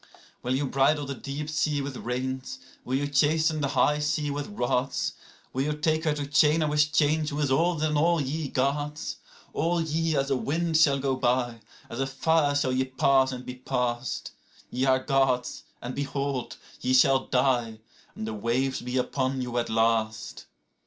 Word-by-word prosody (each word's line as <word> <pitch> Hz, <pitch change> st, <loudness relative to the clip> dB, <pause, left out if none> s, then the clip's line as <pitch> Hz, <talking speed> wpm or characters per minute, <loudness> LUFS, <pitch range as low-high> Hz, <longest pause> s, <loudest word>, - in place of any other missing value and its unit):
65Will 125 Hz, +1 st, 0 dB
ye 135 Hz, -, 0 dB
bridle 140 Hz, +2 st, +2 dB
the 140 Hz, -, -4 dB
deep 140 Hz, +2 st, -5 dB
sea 150 Hz, -1 st, 0 dB
with 140 Hz, -1 st, -4 dB
reins, 130 Hz, +2 st, -4 dB, 0.3 s
will 130 Hz, -, -2 dB
ye 145 Hz, +1 st, 0 dB
chasten 155 Hz, +2 st, +2 dB
the 140 Hz, -, +1 dB
high 150 Hz, +2 st, +2 dB
sea 150 Hz, 0 st, 0 dB
with 145 Hz, 0 st, -3 dB
rods?66Will 130 Hz, -4 st, -3 dB
ye 150 Hz, +1 st, 0 dB
take 155 Hz, +1 st, 0 dB
her 155 Hz, -, +2 dB
to 145 Hz, -1 st, -3 dB
chain 150 Hz, +3 st, +3 dB
her 155 Hz, -, +2 dB
with 150 Hz, 0 st, +2 dB
chains, 155 Hz, 0 st, +2 dB
who 145 Hz, -, -4 dB
is 145 Hz, -3 st, +1 dB
older 160 Hz, +2 st, +2 dB
than 150 Hz, -1 st, 0 dB
all 165 Hz, +3 st, +3 dB
ye 145 Hz, +2 st, -2 dB
Gods?67All 150 Hz, +4 st, -2 dB
ye 165 Hz, 0 st, +1 dB
as 135 Hz, 0 st, 0 dB
a -, -, +3 dB
wind 160 Hz, +5 st, -1 dB
shall 145 Hz, -3 st, +5 dB
go 135 Hz, -1 st, 0 dB
by, 120 Hz, -2 st, 0 dB, 0.3 s
as 120 Hz, -, -7 dB
a 135 Hz, -, 0 dB
fire 145 Hz, +2 st, +2 dB
shall 140 Hz, -3 st, +1 dB
ye 130 Hz, +1 st, +1 dB
pass 130 Hz, 0 st, +3 dB
and 125 Hz, -1 st, -7 dB
be 125 Hz, -, -5 dB
past;68Ye 125 Hz, +1 st, -3 dB
are 130 Hz, 0 st, +3 dB
Gods, 135 Hz, -3 st, 0 dB, 0.2 s
and 125 Hz, +1 st, -4 dB
behold, 140 Hz, -2 st, -3 dB, 0.2 s
ye 130 Hz, 0 st, +1 dB
shall 130 Hz, +1 st, +4 dB
die, 125 Hz, -3 st, +1 dB, 0.4 s
and 110 Hz, -, -5 dB
the 110 Hz, -, -4 dB
waves 120 Hz, +5 st, -1 dB
be 125 Hz, +1 st, -3 dB
upon 130 Hz, 0 st, -1 dB
you 120 Hz, -1 st, -2 dB
at 120 Hz, -, -2 dB
last. 110 Hz, -1 st, 0 dB
135 Hz, 180 wpm, -27 LUFS, 130-150 Hz, 0.4 s, shall